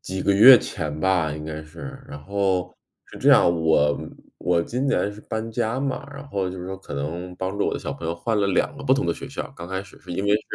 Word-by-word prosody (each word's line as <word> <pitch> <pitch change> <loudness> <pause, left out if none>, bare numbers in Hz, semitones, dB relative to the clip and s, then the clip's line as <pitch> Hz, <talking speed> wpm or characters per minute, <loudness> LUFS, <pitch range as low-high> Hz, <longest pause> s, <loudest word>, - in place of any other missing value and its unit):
几 95 +1 -4
个 100 - +3
月 115 +5 +10
前 75 -8 -4
吧 90 -4 +2
应 75 - -7
该 80 0 -5
是。 135 - -10
然 145 0 -7
后 95 -2 0 0.3
是 - - -12
这 - - +2
样， - - +7 0.2
我 80 -2 +4
嗯， - - -8 0.3
我 85 -1 +1
今 125 +9 -2
年 105 -6 +1
是 105 - -12
搬 110 +1 -4
家 115 +2 -1
嘛， 140 +1 -3
然 140 +1 -9
后 100 -8 -2
就 90 0 -7
是 90 - -6
说 95 +1 -5
可 95 - -8
能 85 +6 -4
帮 95 +2 -3
助 - - +2
我 - - -1
的 - - -2
小 - - -4
朋 80 - -6
友 85 - -1
换 105 +4 -1
了 100 - +2
2 100 - +1
个 140 - -9
不 135 -2 +4
同 140 +1 0
的 - - +1
学 - - -8
校， 135 0 -6
刚 85 -5 -8
开 95 0 -3
始 100 - -16
是 - - -12
因 95 +3 -2
为 100 - +2
是 105 - +3
95 Hz, 290 characters per minute, -24 LUFS, 85-115 Hz, 0.3 s, 月